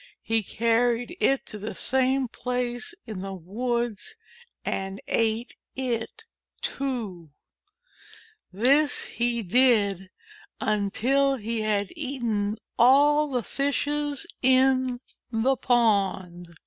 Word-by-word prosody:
He 225 0 +1
carried 235 - 0
it 270 0 +2
to 210 - -8
the 210 +2 -5
same 265 0 +1
place 245 +4 -3
in 215 -5 -6
the 195 0 -5
woods 235 +4 -3 0.5
and 195 0 -3
ate 225 +1 0 0.2
it, 260 - -3 0.4
too. 220 - -3 1.2
This 265 +9 +3
he 235 -1 -1
did 205 -4 +3 0.5
until 245 +7 +1
he 230 -1 -3
had 205 -2 0
eaten 235 -8 -2 0.2
all 290 +4 +5
the 250 -3 -1
Fishes 290 +2 -1 0.2
in 260 -1 +3 0.3
the 240 +4 +2
pond. 195 -8 +1
240 Hz, 95 wpm, -26 LUFS, 210-265 Hz, 1.2 s, all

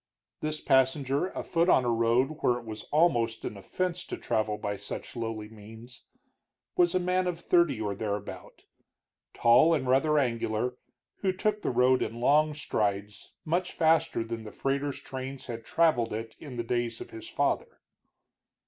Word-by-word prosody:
This 155 0 -2
passenger, 135 +3 +2
afoot 170 -2 0
on 130 - +5
a 120 - +2
road 120 +6 +2
where 120 - +3
it 120 - -10
was 110 -1 -7
almost 120 -8 +2
an - - -4
offense 180 - -3
to - - -5
travel 105 -1 -1
by 105 -1 -3
such - - -7
lowly 115 -2 -4
means, 110 +3 -13 0.7
was 175 0 +3
a - - +4
man 180 +1 +1
of 175 -2 -2
thirty 170 -7 +2
or 105 -2 -2
thereabout, 100 0 -5 0.7
tall 155 +8 +5
and 130 -4 -2
rather 150 +4 +3
angular, 120 -2 0 0.4
who 190 - 0
took 210 +3 -1
the - - -1
road 125 +1 +3
in 115 +2 -3
long 150 +4 +3
strides 105 -6 -2
much 175 +3 -1
faster 160 -6 +2
than 115 0 -5
the 110 -1 -9
freighters' 140 +1 -2
trains 130 0 -7
had 115 -2 -6
traveled 130 -5 +2
it 115 +1 -5
in 140 -5 -9
the 120 - -1
days 120 -1 -2
of - - -9
his 110 - -9
father. - - -1
125 Hz, 165 wpm, -29 LUFS, 115-155 Hz, 0.7 s, on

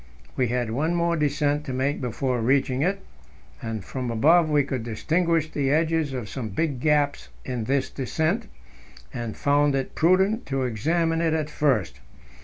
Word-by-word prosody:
We 125 - +1
had 120 -1 -1
one 155 +8 0
more 170 0 +1
descent 150 -1 0
to 130 - -4
make 135 +3 -1
before 125 0 -1
reaching 130 +2 +1
it, 195 +4 -1 0.6
and 110 -4 -5
from 130 -2 -4
above 155 +8 +4
we 145 -2 +3
could 130 -2 -3
distinguish 155 +8 0
the 140 -2 0
edges 160 0 +1
of 125 -5 -4
some 115 +2 -5
big 140 +5 -1
gaps 145 0 +1 0.2
in 125 -4 -3
this 135 +2 +1
descent, 160 - -1 0.7
and 120 -3 -5
found 145 0 +2
it 135 -1 -2
prudent 190 +7 +2
to 135 -1 -1
examine 165 +8 0
it 160 -2 0
first. 130 - 0
145 Hz, 160 wpm, -25 LUFS, 125-160 Hz, 0.7 s, above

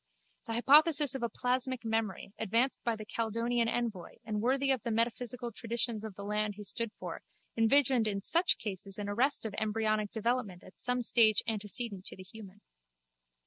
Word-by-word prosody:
The 225 - -3
hypothesis 290 +3 +5
of 265 - -4
a 235 - 0
plasmic 255 0 0
memory, 220 -3 -2
advanced 230 +5 0
by 235 -1 0
the 215 -1 -8
Caledonian 230 +2 -1
envoy 225 -7 -3
and 210 -2 -2
worthy 270 +3 +2
of 260 -3 0
the 235 - -4
metaphysical 235 +1 -1
traditions 230 -1 -2
of 215 -3 -7
the 200 - -8
land 210 0 -1
he 210 - -8
stood 215 +3 -3
for, - - -6 0.3
envisaged 235 0 +3
in 200 -2 -1
such 335 - +2
cases 195 -1 -3
an 205 -1 -4
arrest 245 +6 +1
of 215 - -4
embryonic 215 -1 0
development 225 -4 -2
at - - -15
some 250 0 0
stage 220 -2 +4
antecedent 210 -2 -3
to - - -6
the 185 - -11
human. 205 0 -13
225 Hz, 175 wpm, -31 LUFS, 210-245 Hz, 0.3 s, hypothesis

